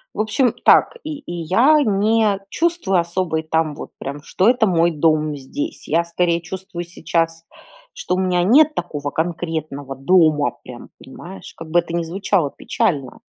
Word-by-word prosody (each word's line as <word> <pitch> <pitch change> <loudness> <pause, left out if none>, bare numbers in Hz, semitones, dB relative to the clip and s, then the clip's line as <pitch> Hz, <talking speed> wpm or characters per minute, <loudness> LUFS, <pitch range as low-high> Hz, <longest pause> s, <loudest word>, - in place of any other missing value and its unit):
В - - -7
общем, 225 +3 +1
так - - +5
и 305 -1 -5
и 175 - -8
я 260 - +4
не 210 -1 +2
чувствую 330 - +1
особо 170 -1 -1
и - - -3
там 160 -1 -1
вот - - -9
прям, 140 +2 -6
что 185 +6 0
это 240 -3 +4
мой 170 -1 +2
дом 155 -1 +1
здесь, 285 - -6
я 165 +3 +2
скорее 170 0 0
чувствую 175 0 -7
сейчас, 165 -1 -2 0.5
что - - -3
у - - -2
меня 180 -2 +1
нет 300 +9 +5
такого 145 -4 -4
конкретного 155 -4 -4
дома 155 0 +3
прям, - - -11
понимаешь, 95 -1 -11
как 165 -1 -9
бы 175 - +5
это 170 0 -4
ни 170 - 0
звучало 175 -3 -1
печально. 135 -6 -2
170 Hz, 165 wpm, -20 LUFS, 160-200 Hz, 0.5 s, так